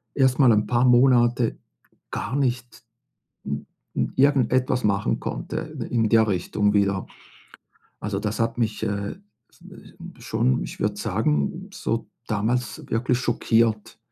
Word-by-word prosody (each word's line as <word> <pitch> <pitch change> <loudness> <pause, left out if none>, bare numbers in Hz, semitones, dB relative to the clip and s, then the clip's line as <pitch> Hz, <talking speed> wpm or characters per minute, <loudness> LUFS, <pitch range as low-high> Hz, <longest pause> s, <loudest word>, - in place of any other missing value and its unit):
erstmal 130 -2 +4
'n 105 -1 +3
paar 120 +1 +2
Monate 120 -1 +4 0.5
gar 130 - -3
nicht 120 -4 -2 0.6
n 70 +1 -4 0.3
n - - -1
irgendetwas 130 -2 +2
machen 100 0 +1
konnte - - -5 0.3
in 115 -2 +2
der 110 -1 +4
Richtung 105 +2 0
wieder. 100 -1 +1 0.9
Also, 100 -2 -3
das 105 +2 -3
hat 115 +1 0
mich, 110 -2 -1
äh, 100 0 -2
äh, - - -24 0.8
w - - -11
schon, 65 +1 +1
ich - - -8
würde - - -1
sagen, 75 -1 -1
so - - -2 0.2
damals 110 +2 -1
wirklich 120 +2 +1
schockiert. 115 -3 +1
115 Hz, 130 wpm, -24 LUFS, 105-125 Hz, 0.9 s, erstmal